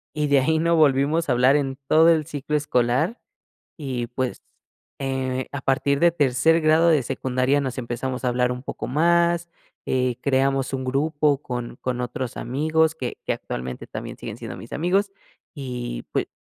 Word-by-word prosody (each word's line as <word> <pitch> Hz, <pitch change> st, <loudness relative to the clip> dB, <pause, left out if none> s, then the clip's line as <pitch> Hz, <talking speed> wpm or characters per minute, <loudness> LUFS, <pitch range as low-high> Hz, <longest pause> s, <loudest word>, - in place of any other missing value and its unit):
Y 150 Hz, -1 st, 0 dB
de 140 Hz, -1 st, +4 dB
ahí 160 Hz, +5 st, +2 dB
no 170 Hz, +1 st, +2 dB
volvimos 150 Hz, +1 st, +3 dB
a 125 Hz, -, +4 dB
hablar 130 Hz, +3 st, +4 dB
en 135 Hz, -2 st, -1 dB
todo 160 Hz, +2 st, +6 dB
el 160 Hz, -2 st, +3 dB
ciclo 150 Hz, -1 st, -3 dB
escolar 140 Hz, -, +1 dB, 0.6 s
y, 130 Hz, -6 st, -3 dB
pues, 125 Hz, 0 st, -3 dB, 0.6 s
eh, 130 Hz, -1 st, -2 dB
a 140 Hz, -, -4 dB
partir 140 Hz, +1 st, +1 dB
de 170 Hz, -1 st, +5 dB
tercer 150 Hz, +2 st, +3 dB
grado 160 Hz, +2 st, +4 dB
de 155 Hz, -4 st, +4 dB
secundaria 130 Hz, +2 st, 0 dB
nos 130 Hz, -2 st, -4 dB
empezamos 125 Hz, +2 st, -4 dB
a -, -, +2 dB
hablar 125 Hz, 0 st, +1 dB
un 125 Hz, +1 st, -6 dB
poco -, -, -5 dB
más, 170 Hz, +4 st, +2 dB, 0.4 s
eh, 125 Hz, -2 st, 0 dB
creamos 135 Hz, 0 st, +1 dB
un 130 Hz, -1 st, -2 dB
grupo 145 Hz, +1 st, +1 dB
con 120 Hz, -1 st, -5 dB
con 125 Hz, -1 st, -2 dB
otros 125 Hz, 0 st, -4 dB
amigos 160 Hz, +5 st, +1 dB
que 125 Hz, -5 st, -5 dB
que -, -, +1 dB
actualmente 65 Hz, 0 st, -6 dB
también -, -, -7 dB
siguen -, -, -7 dB
siendo -, -, -7 dB
mis -, -, -11 dB
amigos 195 Hz, +5 st, +1 dB, 0.4 s
y 125 Hz, -, -5 dB
pue -, -, -1 dB
135 Hz, 170 wpm, -23 LUFS, 125-155 Hz, 0.6 s, todo